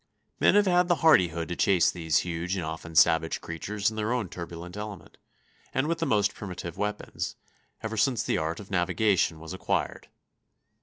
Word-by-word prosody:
Men - - +5
have 205 0 +5
had 180 -1 +3
the 175 - +3
hardihood 85 - +4
to 90 - -2
chase 95 -3 +3
these 80 -4 0
huge 85 +2 -2
and 90 -4 -3
often 80 +1 -7
savage 80 +2 +4
creatures 100 +6 -2
in 110 - -9
their 110 +1 -1
own 120 -7 -1
turbulent 85 +1 -8
element, 105 -3 -8 0.6
and 130 - +2
with 165 +1 -1
the 165 - 0
most 105 -5 +2
primitive 90 -4 -7
weapons, 105 0 -3 0.5
ever 110 0 -3
since 120 +1 +2
the - - 0
art 80 +1 -2
of 100 -1 -11
navigation 95 -2 +1
was 80 +3 -8
acquired. 95 - -2
95 Hz, 175 wpm, -27 LUFS, 85-110 Hz, 0.6 s, Men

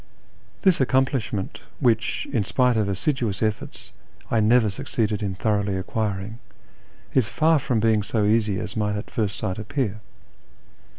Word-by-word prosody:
This 185 -7 +4
accomplishment, 130 -6 0 0.2
which, 120 -3 +1
in 115 -6 +2
spite 125 +4 +2
of 105 -2 +1
assiduous 110 0 -1
efforts, 110 -1 -3 0.4
I 115 - +3
never 110 0 +4
succeeded 105 +2 -2
in 100 -2 -2
thoroughly 100 -2 0
acquiring, 105 +2 -3 0.7
is 130 -6 +3
far 155 +7 +3
from 125 -3 0
being 110 -1 +3
so 105 +1 0
easy 105 -2 +2
as 95 - -5
might 105 -2 0
at 105 - -6
first 105 -4 -1
sight 95 +2 -3
appear. 110 -2 -2
110 Hz, 140 wpm, -24 LUFS, 105-120 Hz, 0.7 s, This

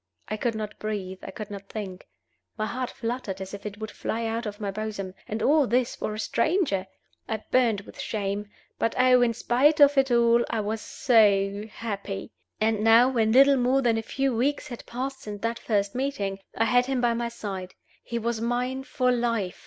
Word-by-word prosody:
I 215 - -2
could 230 +1 -1
not 215 -1 -5
breathe, 195 -3 -4
I - - -8
could 215 -1 -7
not 200 -1 -8
think; 195 -4 -6 0.5
my 215 - -1
heart 250 +3 -3
fluttered 230 -5 -4
as 190 0 -7
if 200 +1 -6
it 205 0 -8
would 220 -1 -5
fly 230 +1 -3
out 225 +1 -2
of 205 0 -6
my 205 -2 -2
bosom 205 -2 -4
and 215 +1 -3
all 295 -1 +4
this 245 +1 +1
for 215 - -3
a - - -6
stranger! 235 - +1 0.4
I 220 -1 -3
burned 235 -5 +3
with - - -14
shame; 205 -1 -3 0.3
but 230 - 0
oh, 255 0 +5
in 235 -2 +2
spite 270 +7 +3
of 285 -1 +7
it 270 0 +2
all, 235 0 +4
I 225 - -1
was 215 +1 -2
so 205 -4 +3
happy! 200 -2 -5 0.3
And 215 -1 +1
now, 230 +3 +7
when 225 -4 +2
little 275 +3 +7
more 260 +2 +2
than 230 -2 +2
a - - -2
few 270 +3 -1
weeks 270 +5 0
had 240 - -8
passed 265 +2 -4
since 205 -1 -7
that 230 0 -1
first 200 -3 0
meeting, 225 -8 -2 0.2
I 225 - +3
had 245 +2 +3
him 270 -2 0
by 240 -1 +2
my 235 0 -2
side; 195 -5 -6 0.3
he 235 - -4
was 230 0 -2
mine 250 +3 -1
for 250 -2 +1
life! 230 -6 -1
225 Hz, 205 wpm, -26 LUFS, 210-250 Hz, 0.5 s, of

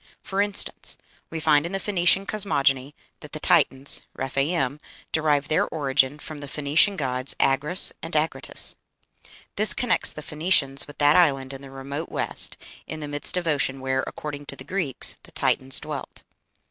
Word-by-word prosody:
For 195 +1 -1
instance, 205 0 +1 0.3
we 165 - -5
find 150 -2 +3
in 170 +3 -6
the 195 - -1
Phoenician 195 -1 +1
cosmogony 145 -10 0 0.2
that - - -13
the - - -4
Titans 135 +1 +2
(Rephaim) 135 +1 -1 0.3
derive 150 -3 +1
their 155 - +1
origin 140 -2 0
from 150 0 -9
the 145 - -8
Phoenician 150 +8 +2
gods 130 -2 0
Agrus 145 +7 +5
and - - -7
Agrotus. - - -1 0.8
This 215 +1 +6
connects 245 - +2
the 150 - -9
Phoenicians 150 -4 +1
with 145 - -13
that 145 0 +4
island 135 -6 +2
in 135 - -8
the 140 - -11
remote 140 +4 -6
west, - - -1 0.3
in 155 - -6
the 150 - -6
midst 145 +4 0
of 180 - -2
ocean, 140 -3 0
where, 130 0 -1
according 145 -1 -7
to - - -8
the 130 - -10
Greeks, 155 -3 -3
the - - -11
Titans 130 0 +2
dwelt. - - -7
145 Hz, 165 wpm, -24 LUFS, 135-165 Hz, 0.8 s, This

